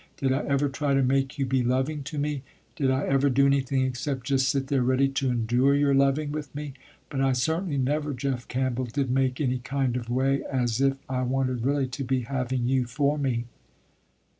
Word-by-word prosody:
Did 135 -1 0
I 135 - +1
ever 140 +1 +2
try 140 0 0
to 135 - +3
make 135 +2 +1
you 135 - 0
be 130 0 +1
loving 130 +5 0
to 150 +2 -6
me. 145 -1 -1 0.3
Did 140 -6 +1
I 130 +2 +1
ever 135 +1 +2
do 140 +2 +4
nothing 135 -1 +1
except 130 0 -3
just 135 -2 +2
sit 135 -1 0
there 135 -1 +1
ready 130 +2 +3
to 135 -1 -1
endure 120 +3 +2
your 140 -1 +3
loving 140 +2 +2
with 150 -2 -6
me. 145 -1 -5 0.4
But 135 -2 -1
I 135 -1 +3
certainly 160 +5 0
never, 145 +3 0
Jeff 130 -2 -3
Campbell, 130 0 -1
did 130 +2 -2
make 130 -1 +1
any 130 -4 0
kind 135 -1 -1
of 120 -2 -4
way 135 +2 +1
as 125 -2 0
if 135 0 +2
I 130 -1 -1
wanted 130 -1 -1
really 140 +1 +1
to 135 +2 -4
be 130 0 0
having 125 -1 -2
you 130 -1 +2
for 140 +4 0
me." 125 -4 -1
135 Hz, 210 wpm, -26 LUFS, 130-140 Hz, 0.4 s, do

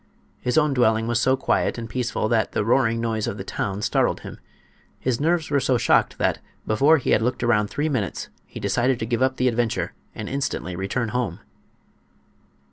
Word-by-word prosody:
His 125 +2 -1
own 150 -2 +3
dwelling 115 -3 +3
was 120 +1 +1
so 130 +1 +3
quiet 130 - 0
and 115 -1 -5
peaceful 120 -1 -1
that 110 -2 +1
the - - 0
roaring 115 -1 +2
noise 115 -2 -1
of 100 - -3
the 95 - -5
town 100 +1 -3
startled - - +1
him. - - -9 0.6
His 125 -2 -1
nerves 160 0 +1
were 140 - +3
so 130 -1 +2
shocked - - +2
that - - +1 0.3
before 140 +9 +4
he 135 - -1
had - - +4
looked 125 +2 -1
around 105 -3 +3
three 150 +2 -1
minutes 120 - -2 0.2
he - - -9
decided 120 +6 +1
to 110 - -3
give 120 +2 -1
up 130 0 +2
the 130 - +2
adventure, 120 -2 0 0.2
and 110 - -5
instantly 130 -10 -3
returned 105 +5 -2
home. 120 -8 -2
120 Hz, 195 wpm, -23 LUFS, 110-130 Hz, 0.6 s, before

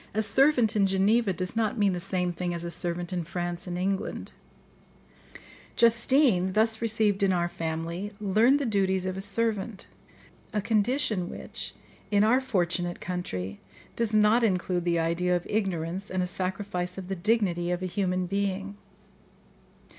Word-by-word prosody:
A 220 - +2
servant 250 -2 +3
in 200 -2 +4
Geneva 200 +3 +2
does 185 +3 -4
not 220 0 0
mean 200 -3 +3
the 180 - -2
same 180 0 -1
thing 175 0 -3
as 170 - -3
a 170 - -4
servant 175 +1 -3
in 175 -1 -1
France 175 +2 -4
and 175 0 -3
England. 190 +2 -2 1.4
Justine, 235 -5 +3
thus 220 +1 +2
received 215 -3 +1
in 195 -1 +3
our 175 -1 +1
family, 165 +4 -4
learned 215 +7 +4
the 285 - -1
duties 190 -4 +1
of 185 0 -2
a 190 - -4
servant, 210 0 -2 0.7
a 210 - +1
condition 215 -2 0
which, - - -6 0.3
in 205 0 +3
our 245 +5 +4
fortunate 175 -7 -1
country, 100 - -4 0.4
does 230 -2 0
not 215 +2 +4
include 180 -4 0
the 170 -1 +2
idea 170 +2 +1
of 175 - -2
ignorance 190 -2 -2
and 185 0 -1
a - - 0
sacrifice 185 -1 -3
of 190 -2 -6
the 195 - -2
dignity 180 -3 +1
of 180 +1 -1
a - - 0
human 185 0 -1
being. 200 +1 -2
190 Hz, 160 wpm, -27 LUFS, 175-215 Hz, 1.4 s, in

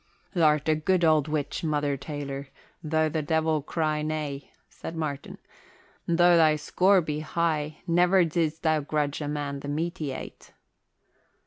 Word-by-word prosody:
"Th' - - -8
art 150 -2 +3
a 155 - +4
good 170 +3 +1
old 155 -2 +3
witch, 150 0 -3
Mother 145 -3 0
Taylor, 140 -1 -6 0.4
though 155 0 +1
the 155 0 -1
Devil 160 0 +1
cry 155 +1 -1
nay," 150 -3 -4 0.2
said 165 - -8
Martin. 150 -3 -4 0.7
"Though 175 +1 +5
thy 155 -2 +5
score 185 +6 +3
be 150 -2 -3
high 155 -1 -2
never 175 +2 +4
did'st 160 -1 -1
thou 155 -1 +3
grudge 145 0 -2
a 145 - -3
man 145 -1 -3
the 140 - -8
meat 165 +5 -2
he 150 -3 -2
ate." - - -9
155 Hz, 155 wpm, -27 LUFS, 145-165 Hz, 0.7 s, Though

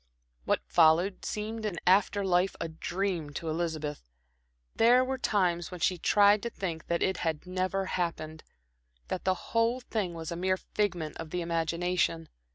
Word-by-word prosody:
What - - +1
followed 170 +4 +3
seemed 215 +1 -4
in 205 -5 -2
after 200 +2 +3
life 180 0 +2
a - - -2
dream 175 0 -3
to 160 +2 -4
Elizabeth. 155 - -3 0.7
There 245 +3 +5
were 265 0 -3
times 175 -7 +1
when 180 - -8
she 180 +1 +1
tried 205 +2 +5
to 235 - -3
think 170 -7 -5
that 170 0 0
it 190 -1 +1
had 160 -1 -2
never 185 +1 -1
happened; 160 -4 -3 0.7
that 185 - -3
the 185 0 +3 0.2
whole 230 +2 +2
thing 210 -8 -3
was 165 0 -6
a - - -3
mere 185 +2 0
figment 180 -7 -2
of 165 -1 -7
the 180 +2 -2
imagination. 170 0 0
180 Hz, 165 wpm, -29 LUFS, 165-200 Hz, 0.7 s, There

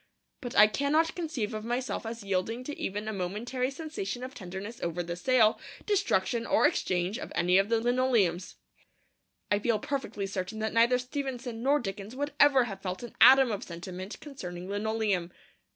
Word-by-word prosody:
But 245 -3 -6
I 210 - +10
cannot 285 +9 +1
conceive 305 -12 -3
of 215 0 -4
myself 240 0 -2
as 230 -1 -6
yielding 200 +5 -1
to 295 +3 -5
even 205 +2 -4
a 220 - -2
momentary 215 +7 -2
sensation 270 -6 -5
of 260 +1 -6
tenderness 195 +2 -7
over 170 +1 -2
the 170 0 -4
sale, 220 +3 +3 0.3
destruction, 235 - +1
or - - +4
exchange 180 +3 0
of - - -7
any 180 +2 +4
of 195 +2 +1
the 230 -1 +3
linoleums. 235 -7 +1 1.0
I 205 - +3
feel 225 +1 +1
perfectly 265 -4 -3
certain 195 +2 -4
that 220 0 -2
neither 235 +2 +4
Stevenson 250 -2 -4
nor 280 +4 +3
Dickens 200 0 -6
would 290 +2 -3
ever 275 -3 +6
have 195 -5 -6
felt 185 +3 -4
an 240 - -9
atom 260 +1 +8
of 205 - -3
sentiment 180 +3 -7
concerning 180 - -8
linoleum. 205 -3 -1
220 Hz, 170 wpm, -29 LUFS, 195-255 Hz, 1.0 s, I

